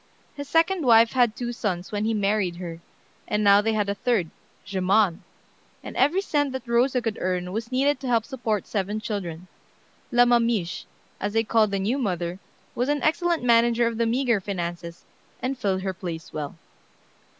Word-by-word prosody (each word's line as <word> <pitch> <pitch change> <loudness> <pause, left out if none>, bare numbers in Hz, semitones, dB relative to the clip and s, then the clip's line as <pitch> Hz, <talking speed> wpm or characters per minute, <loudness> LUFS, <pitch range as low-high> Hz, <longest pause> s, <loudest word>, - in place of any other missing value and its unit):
His 285 -1 -8
second 330 +2 +2
wife 230 -2 +6
had 240 -4 +2
two 240 -1 -4
sons 190 -5 -3
when 210 0 -1
he 225 0 0
married 200 -3 0
her, 170 -2 -7 0.5
and 210 0 0
now 200 0 +6
they 220 +1 0
had 210 -2 0
a 200 - 0
third, 200 -5 0 0.3
Germain, 190 -1 +1 0.6
and - - -8
every 310 +9 +3
cent 290 -7 0
that 260 -2 -6
Rosa 245 +1 +2
could 225 -2 -3
earn 180 -1 -1
was 225 +4 -4
needed 275 +3 +2
to 265 - -6
help 230 -3 +2
support 230 -7 -2
seven 205 +1 -2
children. 185 -6 -5 0.7
"La 245 0 +5
mamiche," 230 -7 +1 0.3
as 205 +1 -3
they 225 0 +2
called 220 -1 +3
the 200 - -1
new 215 +8 0
mother, 180 -5 -2 0.3
was 250 +3 -1
an 290 -1 0
excellent 340 -1 +1
manager 235 0 +4
of 230 -1 -2
the 230 - +2
meagre 235 -3 +1
finances, 175 -3 -5 0.3
and 260 +2 -2
filled 195 -6 -1
her 190 -1 -2
place 170 -3 -7
well. 150 -2 -5
220 Hz, 180 wpm, -25 LUFS, 190-245 Hz, 0.7 s, wife